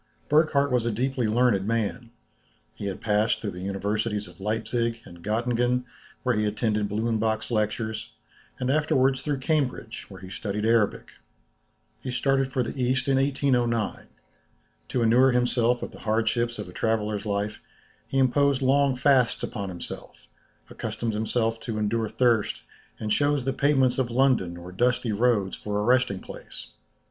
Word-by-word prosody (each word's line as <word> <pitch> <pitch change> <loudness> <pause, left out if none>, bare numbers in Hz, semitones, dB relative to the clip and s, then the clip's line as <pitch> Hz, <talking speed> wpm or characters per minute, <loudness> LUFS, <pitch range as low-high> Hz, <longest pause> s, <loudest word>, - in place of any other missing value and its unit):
Burckhardt 150 -2 +3
was 125 -2 +2
a 115 - 0
deeply 125 +1 0
learned 110 -3 +2
man. 115 +1 -1 0.7
He 100 - -5
had 95 - -5
passed 105 0 +2
through 105 - -4
the 90 0 -8
universities 105 +2 -2
of 90 0 -16
Leipzic, 115 +2 -1
and 85 -1 -13
Göttingen, 120 +3 +1 0.4
where 125 - +2
he 105 -1 +1
attended 105 -1 0
Blumenbach's 110 +1 -1
lectures, 110 0 -1 0.5
and 130 0 0
afterwards 135 -3 +2
through 145 -2 -2
Cambridge, 130 -6 -2
where 95 -2 -10
he 95 0 -10
studied 105 +2 -3
Arabic. 115 -2 +2 0.9
He 130 - -5
started 135 +1 +1
for 130 - +1
the - - -4
East 125 +2 +1
in 135 -1 +3
1809. 125 -5 0 0.8
To 125 - 0
inure 125 +3 +5
himself 125 0 +2
to - - -3
the - - -14
hardships 115 +2 0
of 105 -3 -6
a 90 - -11
traveller's 110 -1 -1
life, 100 +1 -2 0.5
he 135 - -2
imposed 135 +1 +3
long 135 0 +3
fasts 130 -2 +3
upon 100 -4 -4
himself, 90 -2 -8 0.4
accustomed 115 -2 -4
himself 115 +1 0
to 115 -2 -4
endure 110 +1 0
thirst, 120 -3 +1 0.4
and 105 -1 -3
chose 145 +2 +2
the 135 - 0
pavements 135 -2 +2
of 125 -2 0
London 120 -9 +2
or 90 +1 -9
dusty 120 +3 +1
roads 105 -3 +1
for 105 -1 -4
a - - 0
resting 125 -5 +3
place. - - -10
115 Hz, 155 wpm, -26 LUFS, 105-130 Hz, 0.9 s, inure